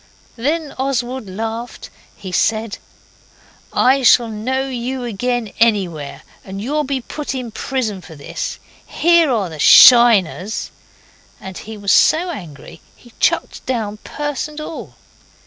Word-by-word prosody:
Then 295 Hz, +5 st, -2 dB
Oswald 260 Hz, -4 st, -2 dB
laughed. 225 Hz, +4 st, -6 dB, 0.2 s
He 190 Hz, -2 st, -9 dB
said 220 Hz, +3 st, 0 dB, 0.9 s
'I 265 Hz, +2 st, +3 dB
shall 240 Hz, -2 st, +5 dB
know 255 Hz, +5 st, -2 dB
you 255 Hz, 0 st, -4 dB
again 240 Hz, 0 st, -3 dB
anywhere, 185 Hz, -11 st, 0 dB, 0.2 s
and 195 Hz, 0 st, -8 dB
you'll 295 Hz, +8 st, -1 dB
be 265 Hz, -1 st, -2 dB
put 290 Hz, +3 st, -6 dB
in 250 Hz, -3 st, -5 dB
prison 220 Hz, -4 st, -3 dB
for 160 Hz, -, -13 dB
this. 140 Hz, -, -6 dB, 0.3 s
Here 340 Hz, -2 st, +3 dB
are 215 Hz, -6 st, 0 dB
the 155 Hz, -2 st, -10 dB
SHINERS.' 220 Hz, -, +6 dB, 0.7 s
And 190 Hz, -1 st, -9 dB
he 220 Hz, +3 st, -9 dB
was 200 Hz, -1 st, -1 dB
so 350 Hz, +3 st, +4 dB
angry 160 Hz, -, -10 dB
he 240 Hz, -2 st, -20 dB
chucked -, -, 0 dB
down 220 Hz, -5 st, -2 dB
purse 290 Hz, +5 st, -4 dB
and 300 Hz, 0 st, -10 dB
all. 305 Hz, +1 st, -8 dB
235 Hz, 130 wpm, -18 LUFS, 205-265 Hz, 0.9 s, SHINERS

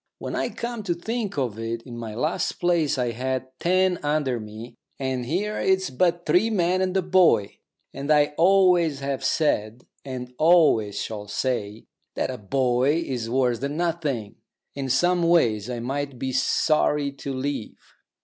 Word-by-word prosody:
When -, -, -5 dB
I -, -, -1 dB
come 235 Hz, -1 st, -5 dB
to 175 Hz, -3 st, 0 dB
think 220 Hz, +1 st, -4 dB
of 120 Hz, -6 st, -2 dB
it, 115 Hz, +1 st, -4 dB
in 120 Hz, -3 st, -9 dB
my 115 Hz, -2 st, -6 dB
last 155 Hz, +8 st, -1 dB
place 165 Hz, -5 st, +1 dB
I 125 Hz, -2 st, 0 dB
had 130 Hz, +2 st, -2 dB
ten 185 Hz, 0 st, +2 dB
under 145 Hz, -4 st, 0 dB
me, 110 Hz, +2 st, -9 dB, 0.2 s
and 130 Hz, -2 st, -3 dB
here 205 Hz, +8 st, -1 dB
it's 190 Hz, -4 st, +1 dB
but 175 Hz, +5 st, +1 dB
three 180 Hz, +8 st, +3 dB
men 185 Hz, -3 st, +1 dB
and 190 Hz, 0 st, 0 dB
a 190 Hz, -, +1 dB
boy, 180 Hz, -, +3 dB, 0.3 s
and 140 Hz, +2 st, -6 dB
I 150 Hz, -1 st, +4 dB
always 175 Hz, -4 st, +4 dB
have 140 Hz, -1 st, -3 dB
said 120 Hz, -6 st, 0 dB, 0.2 s
and 125 Hz, -2 st, -7 dB
always 155 Hz, -, +4 dB
shall 105 Hz, -2 st, -5 dB
say 110 Hz, -1 st, -3 dB, 0.3 s
that -, -, -1 dB
a 125 Hz, -, -7 dB
boy 125 Hz, +6 st, +1 dB
is 120 Hz, -4 st, -3 dB
worse 125 Hz, -2 st, +1 dB
than 140 Hz, +2 st, -3 dB
nothing. 155 Hz, -11 st, -2 dB, 0.4 s
In 135 Hz, -1 st, -4 dB
some 175 Hz, +7 st, +2 dB
ways 120 Hz, -, +2 dB
I 120 Hz, -1 st, -3 dB
might 135 Hz, +2 st, -3 dB
be 130 Hz, +1 st, -3 dB
sorry 145 Hz, +2 st, +1 dB
to 140 Hz, -, -5 dB
leave. 135 Hz, -3 st, -4 dB
140 Hz, 165 wpm, -24 LUFS, 125-175 Hz, 0.4 s, I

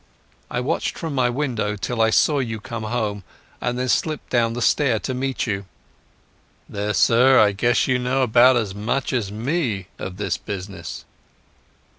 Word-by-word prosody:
I 125 Hz, -, -2 dB
watched 125 Hz, -, -2 dB
from 165 Hz, -3 st, -4 dB
my 130 Hz, -2 st, +2 dB
window 120 Hz, -6 st, -1 dB
till 115 Hz, +3 st, -2 dB
I 110 Hz, -, +4 dB
saw 145 Hz, +5 st, +3 dB
you 115 Hz, -4 st, -3 dB
come 115 Hz, -1 st, -6 dB
home, 105 Hz, -3 st, -2 dB, 0.4 s
and 120 Hz, 0 st, -1 dB
then 130 Hz, 0 st, -1 dB
slipped 155 Hz, +3 st, -1 dB
down 115 Hz, -2 st, +2 dB
the 120 Hz, -, -4 dB
stair 130 Hz, +1 st, +3 dB
to 130 Hz, -, -4 dB
meet 130 Hz, +1 st, -2 dB
you.... 100 Hz, -3 st, -3 dB, 1.0 s
There, 105 Hz, 0 st, -3 dB
sir, 125 Hz, +8 st, +5 dB
I 105 Hz, -1 st, +5 dB
guess 120 Hz, +5 st, +2 dB
you 130 Hz, -1 st, +2 dB
know 130 Hz, +2 st, +1 dB
about 125 Hz, +2 st, +5 dB
as 105 Hz, -5 st, -1 dB
much 110 Hz, +8 st, -2 dB
as 110 Hz, -6 st, -1 dB
me 115 Hz, -, -2 dB
of 95 Hz, 0 st, -6 dB
this 105 Hz, -, -1 dB
business." 100 Hz, -1 st, -7 dB
120 Hz, 170 wpm, -22 LUFS, 105-130 Hz, 1.0 s, sir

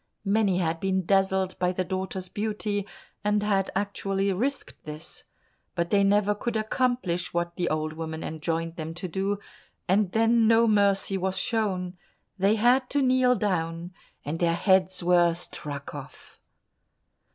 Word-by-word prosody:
Many 200 Hz, -2 st, +2 dB
had 165 Hz, -2 st, 0 dB
been 190 Hz, -1 st, 0 dB
dazzled 190 Hz, 0 st, +1 dB
by 180 Hz, 0 st, +2 dB
the 185 Hz, 0 st, -1 dB
daughter's 185 Hz, 0 st, -4 dB
beauty, 210 Hz, 0 st, -2 dB, 0.4 s
and 210 Hz, 0 st, +1 dB
had 195 Hz, -2 st, +1 dB
actually 195 Hz, 0 st, -1 dB
risked 265 Hz, +8 st, -3 dB
this, 155 Hz, +1 st, -7 dB, 0.5 s
but 170 Hz, -1 st, -1 dB
they 200 Hz, -1 st, +4 dB
never 205 Hz, +1 st, +3 dB
could 225 Hz, +2 st, -3 dB
accomplish 215 Hz, -7 st, -1 dB
what 170 Hz, 0 st, -1 dB
the 175 Hz, -, -1 dB
old 155 Hz, 0 st, -1 dB
woman 160 Hz, 0 st, -5 dB
enjoined 165 Hz, +1 st, -3 dB
them 160 Hz, 0 st, -5 dB
to 185 Hz, -, -5 dB
do, 195 Hz, +3 st, -1 dB, 0.5 s
and 190 Hz, 0 st, +2 dB
then 225 Hz, +1 st, +3 dB
no 230 Hz, +1 st, +5 dB
mercy 200 Hz, -2 st, +3 dB
was 190 Hz, +1 st, -1 dB
shown; 185 Hz, -4 st, -1 dB, 0.4 s
they 200 Hz, +3 st, +4 dB
had 250 Hz, +4 st, +3 dB
to 285 Hz, -1 st, +1 dB
kneel 255 Hz, -1 st, +4 dB
down, 175 Hz, -4 st, -2 dB, 0.3 s
and 155 Hz, +3 st, -3 dB
their 170 Hz, -1 st, +2 dB
heads 185 Hz, 0 st, +2 dB
were 175 Hz, -1 st, +4 dB
struck 145 Hz, -4 st, -5 dB
off. -, -, -11 dB
190 Hz, 150 wpm, -26 LUFS, 175-210 Hz, 0.5 s, no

